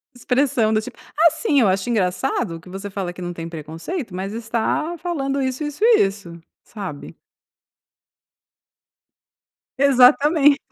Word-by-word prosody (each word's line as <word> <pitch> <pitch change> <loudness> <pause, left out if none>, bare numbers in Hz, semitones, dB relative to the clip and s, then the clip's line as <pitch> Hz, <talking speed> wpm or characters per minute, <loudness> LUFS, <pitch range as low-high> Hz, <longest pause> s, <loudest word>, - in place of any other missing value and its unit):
Expressão, 245 -3 +1
do 215 - +2
tipo: - - -10 0.2
"Ah, 330 -1 +6
sim, 315 -4 +1
eu 215 - +4
acho 190 +4 0
engraçado 190 -3 -1
que 180 - -15
você 195 +2 -7
fala 190 -3 -4
que 180 - -11
não 175 0 -4
tem 165 -1 -6
preconceito, 165 - -6
mas 195 +3 -4
está 235 +9 -2
falando 280 -5 -2
isso, 260 +2 -2
isso, 295 -1 -5
e 465 -1 +6
isso", 195 -4 -7 0.2
sabe. 190 -9 -8 2.6
Exatame 280 +2 +5
230 Hz, 135 wpm, -21 LUFS, 185-280 Hz, 2.6 s, Ah